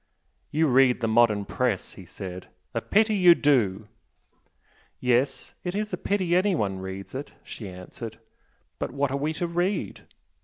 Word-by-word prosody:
"You 160 +2 +2
read 130 -2 +4
the 115 - 0
modern 110 -3 +3
Press" 120 -2 -1
he 95 - -12
said 90 0 -8 0.3
"A 115 - -1
pity 215 - +3
you 180 -4 +7
do!" 110 - +2 1.1
"Yes 125 +2 +1
it's 205 +3 -3
a - - +3
pity 185 -1 0
anyone 160 - +1
reads 95 0 -7
it!" 135 +2 -6
she 105 -4 -8
answered 100 +5 -9 0.6
"But - - -2
what 140 +1 -1
are 140 - 0
we 150 +3 -1
to 175 - -2
read? 175 - -2
125 Hz, 150 wpm, -26 LUFS, 105-175 Hz, 1.1 s, you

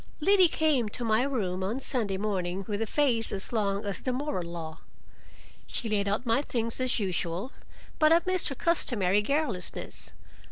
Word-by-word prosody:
Liddy 375 +3 +5
came 300 -9 +1
to 240 - -5
my 220 +1 +3
room 200 -9 -1
on 215 +7 -2
Sunday 225 -8 -1
morning 190 -2 -2
with 205 0 -2
a 225 - -1
face 245 -4 +1
as 195 +4 -4
long 200 -2 0
as 200 -4 -3
the 255 - -1
moral 250 - -2
law. 165 -2 -7 0.9
She 235 - -3
laid 205 -2 0
out 205 +5 -1
my 230 +3 +2
things 230 -3 -2
as 255 -1 +2
usual, 185 +2 -2 0.5
but 310 -1 +5
I 335 - +7
missed 370 -1 +2
her 275 - -4
customary 210 - +2
garrulousness. 275 -6 -3
225 Hz, 170 wpm, -28 LUFS, 195-275 Hz, 0.9 s, I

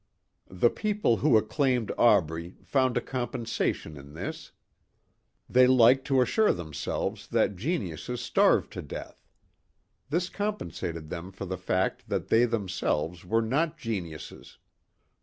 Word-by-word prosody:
The 95 +6 +2
people 210 - +1
who 110 +3 +4
acclaimed 125 +1 +1
Aubrey 85 -6 +2
found 130 -3 +1
a - - +1
compensation 120 - -3
in 70 +2 -12
this. - - -6 1.0
They 125 0 +5
liked 130 +1 +5
to 135 -2 +3
assure 220 - +3
themselves 80 -5 -4
that 100 - +1
geniuses 120 - -3
starved 120 - +2
to - - -5
death. - - -9 0.9
This 170 +4 0
compensated 85 - -4
them 90 +3 -6
for 95 +1 -7
the 95 - -4
fact 95 +1 -1
that - - -2
they 115 +2 +5
themselves 95 -7 -2
were 115 +5 +1
not 155 +8 0
geniuses. 95 - -6
115 Hz, 125 wpm, -28 LUFS, 90-130 Hz, 1.0 s, They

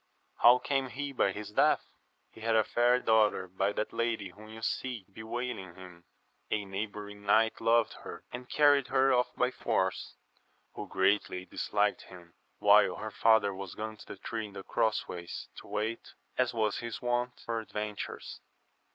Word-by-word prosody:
— - - -43
How 120 +1 +8
came 135 0 -1
he 140 +2 -4
by 120 -7 +2
his 105 +2 -7
death? - - +3 0.2
— - - -44
He 110 - -14
had 115 0 +1
a 110 - +5
fair 120 +3 +3
daughter 110 -5 +3
by 95 +2 0
that 110 - -3
lady 115 -4 -1
whom 105 +4 -14
you 110 0 -10
see 120 -4 -2
bewailing 110 -4 -5
him; 90 -2 -13 0.4
a 105 -2 -1
neighbouring 105 +1 -6
knight 110 +2 +3
loved 115 0 +3
her, - - -8
and 125 +1 -8
carried 145 -3 +4
her 135 0 +3
off 125 0 +3
by 125 +1 +1
force, - - -1 0.6
who - - -6
greatly 95 -1 +1
disliked 105 +2 0
him, 85 -2 -14 0.2
while - - +5
her - - -6
father 110 -3 +4
was 95 -1 -7
gone 110 0 -5
to - - -13
the - - -8
tree 110 +2 -4
in 100 - -15
the 95 - -7
cross 110 +2 0
ways 85 -1 -7
to - - -10
wait, 110 +2 -3 0.2
as 125 -1 +2
was 110 -3 0
his 120 -1 -5
wont, 120 0 -1
for 115 -1 -1
adventures. 105 -1 -5
110 Hz, 175 wpm, -31 LUFS, 100-120 Hz, 0.6 s, How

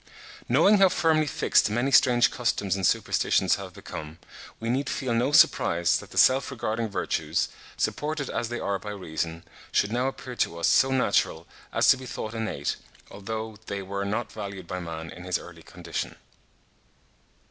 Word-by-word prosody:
Knowing 180 - +5
how 195 -1 +7
firmly 160 -3 +2
fixed 120 - +2
many 120 +6 0
strange 125 -3 +5
customs 105 -5 0
and 95 -3 +1
superstitions - - +2
have - - -8
become, 80 +1 -8 0.4
we 115 - -5
need 130 +4 0
feel 130 -4 -2
no 120 +4 +1
surprise 85 - +4
that - - -12
the - - -11
self 130 +1 +5
regarding 115 -3 -2
virtues, 100 - -1 0.3
supported 150 -2 -2
as 120 - -3
they 120 - -3
are 100 -1 -1
by 105 - -8
reason, 85 -4 -4 0.3
should 100 - +1
now 125 +3 0
appear 130 -2 -6
to 85 - -1
us 85 - +1
so 135 - +4
natural 130 -6 +1 0.3
as - - +2
to 135 - +7
be 130 0 -9
thought 110 -2 -5
innate, 110 -11 -2 0.3
although 110 +1 -6
they 100 -1 -4
were 100 +1 -4
not 105 +4 -2
valued 100 -3 -7
by 90 +2 -5
man 80 -2 -6
in 90 - -10
his 90 -1 0
early - - -12
condition. - - -6
110 Hz, 170 wpm, -26 LUFS, 95-130 Hz, 0.4 s, how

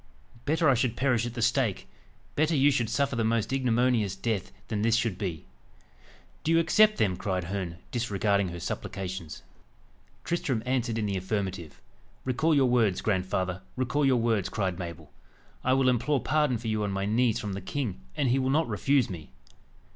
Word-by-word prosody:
Better 160 +2 +2
I 135 - +6
should 120 -1 0
perish 120 -3 +1
at 120 - -7
the 115 - -1
stake 125 -4 +1 0.5
better 155 +2 +2
you 145 +1 +5
should 120 -5 0
suffer 140 +2 0
the 115 - 0
most 115 +2 0
ignominious 120 -5 +2
death, 110 -6 -2 0.2
than 105 -2 -2
this 115 +1 +3
should 115 -4 0
be." 90 -5 -4 1.0
"Do 160 - +1
you 165 - +5
accept 215 +6 +4
them?" 95 -4 +2
cried 95 -1 -2
Herne, 90 -1 -4
disregarding 100 -4 +1
her 85 0 -6
supplications. 95 -2 -5 0.8
Tristram 135 -9 -1
answered 125 -3 0
in 110 - 0
the 100 -2 -1
affirmative. 95 -4 -3 0.5
"Recall 150 +5 +2
your 140 -2 +4
words, 115 -6 +2
grandfather 95 -2 -1
recall 130 +3 0
your 135 -2 +4
words!" 115 -5 +1
cried 95 -4 -2
Mabel. 85 -4 -7 0.5
"I 130 - +3
will 135 -1 +3
implore 130 +3 +2
pardon 150 -2 +1
for 115 +1 -7
you 110 -1 0
on 100 - -1
my 95 0 -2
knees 115 +2 +2
from 105 -2 -4
the 100 - -5
king, 105 - -3 0.2
and 135 -3 +2
he 130 +3 +3
will 130 0 0
not 155 +4 +2
refuse 130 +4 +2
me." 85 -5 -8
115 Hz, 180 wpm, -28 LUFS, 95-130 Hz, 1.0 s, I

